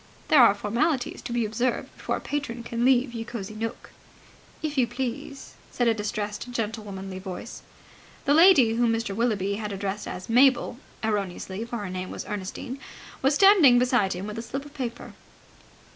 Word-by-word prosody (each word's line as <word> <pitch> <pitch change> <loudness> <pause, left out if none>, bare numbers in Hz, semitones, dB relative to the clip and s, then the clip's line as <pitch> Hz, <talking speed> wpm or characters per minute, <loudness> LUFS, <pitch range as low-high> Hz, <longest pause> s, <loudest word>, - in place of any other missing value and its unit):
There 295 - +7
are 215 -4 +7
formalities 245 +7 -1
to - - -6
be 235 -1 +1
observed 235 +4 -2
before - - -2
a - - -4
patron 260 -5 -4
can 235 0 -3
leave 250 -1 +3
Ye 230 -1 -4
Cosy 225 -3 -6
Nooke. 225 +2 -5 0.7
"If 305 -1 -2
you 255 -4 +3
please!" 250 +3 -5 0.2
said 245 - 0
a 230 - +5
distressed 210 +1 -4
gentlewomanly 205 -5 -4
voice. 190 +4 -7 0.6
The 285 - +4
lady 310 -8 +7
whom 235 0 +2
Mr. 225 -3 -2
Willoughby 200 -4 0
had 210 -1 -4
addressed 195 +1 -4
as 180 +1 -6
Mabel 250 0 +4 0.2
erroneously, 200 -1 -2
for 235 0 -5
her 205 -4 -5
name 185 0 -4
was - - -6
Ernestine 210 +6 -5 0.4
was 270 +2 +3
standing 360 -10 +7
beside 245 -6 +2
him 180 +2 -5
with 210 +1 -5
a - - -3
slip 265 +5 -5
of 290 - -13
paper. 240 -4 -5
230 Hz, 175 wpm, -26 LUFS, 205-250 Hz, 0.7 s, There